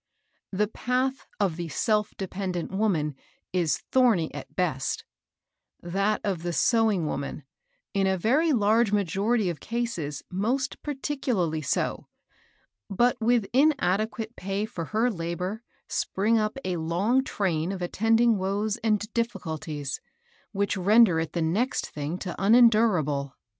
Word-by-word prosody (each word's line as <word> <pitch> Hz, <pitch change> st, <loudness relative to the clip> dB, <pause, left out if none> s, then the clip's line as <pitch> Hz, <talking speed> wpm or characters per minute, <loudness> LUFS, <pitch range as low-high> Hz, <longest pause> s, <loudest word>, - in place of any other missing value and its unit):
The 205 Hz, +2 st, +1 dB
path 255 Hz, +4 st, -1 dB
of 190 Hz, -6 st, +1 dB
the 170 Hz, -1 st, -4 dB
self 210 Hz, +3 st, 0 dB
dependent 185 Hz, -2 st, -3 dB
wom^n 190 Hz, -7 st, 0 dB, 0.4 s
is 170 Hz, -6 st, +1 dB
thorny 230 Hz, -11 st, +3 dB
at -, -, -9 dB
best; 150 Hz, -8 st, -1 dB, 0.7 s
that 195 Hz, +5 st, 0 dB
of 190 Hz, -5 st, -1 dB
the 175 Hz, 0 st, -3 dB
sewing 220 Hz, -5 st, +2 dB
woman, 140 Hz, -1 st, -4 dB, 0.5 s
in 195 Hz, -1 st, +2 dB
a 190 Hz, 0 st, +1 dB
very 280 Hz, -, +2 dB
large 220 Hz, -2 st, +3 dB
majority 205 Hz, +2 st, +1 dB
oi 165 Hz, -, -7 dB
cases, 230 Hz, -, -3 dB
most 245 Hz, +8 st, -1 dB
particularly 260 Hz, -, -1 dB
so; 145 Hz, -, -1 dB, 0.8 s
but 240 Hz, +5 st, +2 dB
with 235 Hz, -1 st, +3 dB
inad 265 Hz, -, +3 dB
equate 220 Hz, +1 st, -4 dB
pay 195 Hz, +2 st, -2 dB
for 185 Hz, -7 st, -5 dB
her 225 Hz, +6 st, +1 dB
labor 180 Hz, +3 st, -4 dB, 0.3 s
spring 210 Hz, +4 st, 0 dB
up 215 Hz, +4 st, -1 dB
a 180 Hz, -2 st, -1 dB
long 185 Hz, +11 st, +1 dB
train 180 Hz, -8 st, -1 dB
of 190 Hz, -2 st, -4 dB
attending 225 Hz, +4 st, +3 dB
woes 200 Hz, +3 st, -1 dB
and 215 Hz, -2 st, +1 dB
difficulties, 160 Hz, -, -3 dB, 0.5 s
which 200 Hz, -1 st, 0 dB
render 200 Hz, -2 st, +5 dB
it 165 Hz, -, -3 dB
the 170 Hz, -, 0 dB
next 210 Hz, +12 st, 0 dB
thing 150 Hz, +4 st, -4 dB
to 185 Hz, -1 st, -5 dB
unendurable. 195 Hz, -, +4 dB
200 Hz, 130 wpm, -26 LUFS, 175-230 Hz, 0.8 s, render